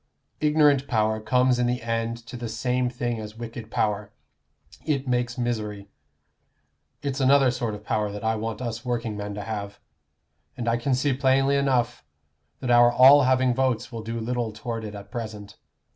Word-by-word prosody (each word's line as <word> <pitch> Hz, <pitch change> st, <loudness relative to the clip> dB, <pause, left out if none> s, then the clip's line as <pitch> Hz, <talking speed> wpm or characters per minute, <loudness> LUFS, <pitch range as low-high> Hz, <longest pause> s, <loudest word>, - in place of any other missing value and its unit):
Ignorant 150 Hz, -3 st, +3 dB
power 110 Hz, -1 st, +1 dB
comes 125 Hz, +2 st, +2 dB
in 120 Hz, -, +2 dB
the 125 Hz, 0 st, -2 dB
end 115 Hz, 0 st, -2 dB
to 125 Hz, -, -9 dB
the 120 Hz, -1 st, -5 dB
same 125 Hz, +2 st, 0 dB
thing 120 Hz, -2 st, -3 dB
as 105 Hz, 0 st, -8 dB
wicked 115 Hz, -1 st, -7 dB
power; 105 Hz, -2 st, -1 dB, 0.7 s
it 140 Hz, -3 st, -1 dB
makes 125 Hz, 0 st, -1 dB
misery. 105 Hz, -5 st, -3 dB, 1.1 s
It's 140 Hz, -1 st, -2 dB
another 135 Hz, -1 st, +5 dB
sort 120 Hz, -3 st, -3 dB
of 105 Hz, 0 st, -12 dB
power 105 Hz, -1 st, -1 dB
that 105 Hz, +1 st, -7 dB
I 110 Hz, 0 st, +1 dB
want 110 Hz, +2 st, -4 dB
us 115 Hz, -1 st, -4 dB
workingmen 110 Hz, -4 st, -3 dB
to 105 Hz, -, -5 dB
have, 100 Hz, -2 st, -5 dB, 0.8 s
and 120 Hz, -, -4 dB
I 115 Hz, 0 st, +2 dB
can 130 Hz, +2 st, 0 dB
see 135 Hz, +2 st, +1 dB
plainly 135 Hz, +1 st, +2 dB
enough 125 Hz, -4 st, +1 dB, 0.6 s
that 125 Hz, -, -1 dB
our 120 Hz, 0 st, +6 dB
all 135 Hz, +3 st, +7 dB
having 130 Hz, -1 st, +3 dB
votes 130 Hz, -2 st, 0 dB
will 115 Hz, -2 st, -5 dB
do 115 Hz, +1 st, -4 dB
little 120 Hz, 0 st, -2 dB
toward 115 Hz, +1 st, -5 dB
it 105 Hz, -1 st, -7 dB
at 100 Hz, -1 st, -10 dB
present. 110 Hz, -4 st, -7 dB
120 Hz, 175 wpm, -25 LUFS, 110-130 Hz, 1.1 s, all